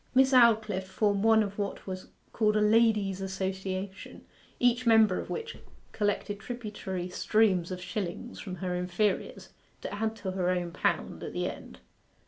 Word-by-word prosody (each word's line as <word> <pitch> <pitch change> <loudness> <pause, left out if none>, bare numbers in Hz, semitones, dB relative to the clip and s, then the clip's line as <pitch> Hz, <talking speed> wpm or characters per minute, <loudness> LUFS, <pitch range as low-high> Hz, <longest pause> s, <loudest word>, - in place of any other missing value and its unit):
Miss 265 +1 +5
Aldclyffe 220 -6 +4
formed 200 0 +1
one 220 -1 +5
of 200 0 -6
what 200 -1 -3
was 185 -1 -6 0.3
called 215 -1 +2
a - - +3
Ladies' 210 -3 +3
Association, 190 0 -4 0.3
each 245 0 +2
member 220 -4 +5
of - - -7
which 460 0 -5 0.3
collected 205 -1 -1
tributary 210 -6 -5
streams 185 -1 +2
of 185 -1 -5
shillings 185 +5 -5
from 185 -3 -6
her 185 -1 -3
inferiors, 180 +3 -1 0.3
to - - -5
add 220 +2 -1
to 195 -4 -4
her 185 -1 0
own 180 -1 -1
pound - - -1
at - - -6
the - - -1
end. - - -9
205 Hz, 155 wpm, -29 LUFS, 185-220 Hz, 0.3 s, Miss